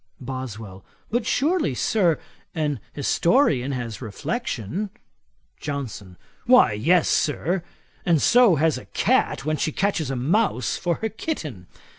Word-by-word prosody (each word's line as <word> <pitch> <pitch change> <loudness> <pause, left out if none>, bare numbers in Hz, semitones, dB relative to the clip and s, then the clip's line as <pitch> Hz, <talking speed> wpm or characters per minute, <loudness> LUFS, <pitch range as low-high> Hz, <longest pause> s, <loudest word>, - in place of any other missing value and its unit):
BOSWELL. 115 -7 -7 0.3
'But 235 0 0
surely, 295 - +1
Sir, 175 - +2 0.4
an 150 -5 -1
historian 145 - +2
has 120 -3 -5
reflection.' 155 - -3 0.7
JOHNSON. 120 -10 -6 0.3
'Why 250 - +6
yes, 160 +11 +3
Sir; 170 +4 +1 0.4
and 165 -3 +3
so 240 - +5
has 155 -2 +1
a - - -13
cat - - +1
when 155 0 0
she 155 - 0
catches 175 -5 0
a 135 - -2
mouse 140 - +1
for 175 -2 -1
her 220 - +1
kitten. 155 - -5
155 Hz, 125 wpm, -24 LUFS, 125-200 Hz, 0.7 s, Why